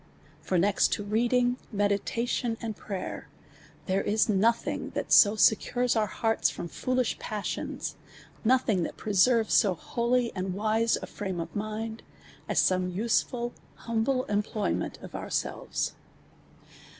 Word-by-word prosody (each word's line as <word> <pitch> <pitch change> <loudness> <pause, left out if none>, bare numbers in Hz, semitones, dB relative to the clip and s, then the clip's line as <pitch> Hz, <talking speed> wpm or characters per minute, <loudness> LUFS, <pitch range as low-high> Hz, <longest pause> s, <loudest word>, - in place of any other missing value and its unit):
For 185 - 0
next 195 +3 +3
to 205 - -2
reading, 245 +4 +2
meditation, 225 +3 0
and 225 -2 -4
prayer, 195 -2 -6 0.6
there 190 +1 +1
is 215 +1 +2
nothing 220 +3 +1
that - - -3
so 205 0 +7
secures 245 +3 +3
pur 220 -2 +1
hearts 225 +1 +1
from 170 - -6
foolish 255 +3 -1
pas 210 -2 -4
sions, - - -4 0.5
nothing 235 -5 +3
that - - -4
preserves 220 +2 +3
so 195 -4 +4
holy 235 +5 0
and 185 -1 -3
wise 220 +2 +2
a - - -2
frame 190 -4 -5
of 165 - -6
mind, 215 +2 -4 0.5
as - - -1
some 185 -1 +2
useful, 235 +4 0 0.2
humble, 230 +3 0
employment 210 0 -1
of - - -10
our - - -5
selves. - - -2
220 Hz, 135 wpm, -28 LUFS, 200-235 Hz, 0.6 s, so